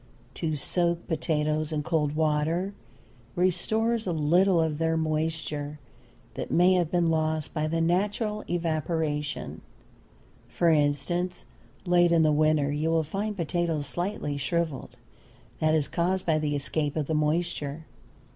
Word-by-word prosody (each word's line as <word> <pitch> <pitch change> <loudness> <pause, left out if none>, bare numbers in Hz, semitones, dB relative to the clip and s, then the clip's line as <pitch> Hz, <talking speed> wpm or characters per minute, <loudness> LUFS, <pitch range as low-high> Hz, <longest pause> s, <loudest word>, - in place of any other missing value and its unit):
To 155 0 -2
soak 170 +4 0
potatoes 155 -1 0
in 150 -1 -1
cold 150 -2 0
water 160 +5 0 0.6
restores 220 +5 +1
a - - +1
little 170 +4 +3
of 160 -2 0
their 165 0 +1
moisture 155 -2 -2 0.5
that - - -5
may 180 +2 +4
have 175 -3 +1
been 170 -2 +2
lost 155 -1 -1
by 155 -1 -1
the 165 +1 0
natural 210 +5 0
evaporation. 160 -3 -2 0.9
For 170 - +1
instance, 165 +4 0 0.4
late 175 -1 +4
in 165 -1 +4
the 155 - +4
winter 150 -1 +2
you 150 +2 -1
will 165 -1 +2
find 200 +6 -3
potatoes 170 -3 -1
slightly 175 -2 -2
shriveled. 155 0 -2 0.6
That 155 0 +3
is 150 -3 +1
caused 185 +2 0
by 160 -2 +2
the 150 -1 -1
escape 145 +1 -1
of 155 -2 -1
the 160 - -2
moisture. 155 -1 -1
160 Hz, 135 wpm, -27 LUFS, 150-175 Hz, 0.9 s, may